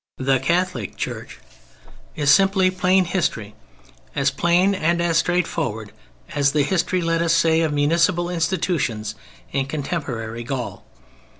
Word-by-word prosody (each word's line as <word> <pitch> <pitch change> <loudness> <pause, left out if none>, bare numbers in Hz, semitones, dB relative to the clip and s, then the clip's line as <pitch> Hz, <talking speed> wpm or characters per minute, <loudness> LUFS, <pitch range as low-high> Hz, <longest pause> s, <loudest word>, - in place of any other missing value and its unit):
] - - -70
the 135 0 +1
Catholic 170 - -1
Church, - - -5 0.8
is 145 -2 +3
simply 190 +2 +4
plain 185 0 +2
history, 130 - -2 0.6
as - - +2
plain 175 +3 +2
and 170 -2 0 0.2
straightforward 165 - -1 0.4
as 140 -1 +2
the 150 -1 +3
history, 180 +2 0
let 165 0 +1
us 165 -1 +2
say, 165 -1 +3
of 160 -2 0
municipal 170 +4 +2
institutions 165 - -1 0.4
in 135 -1 -1
contemporary 135 -7 -4
Gaul. 125 0 -5
165 Hz, 125 wpm, -22 LUFS, 135-180 Hz, 0.8 s, simply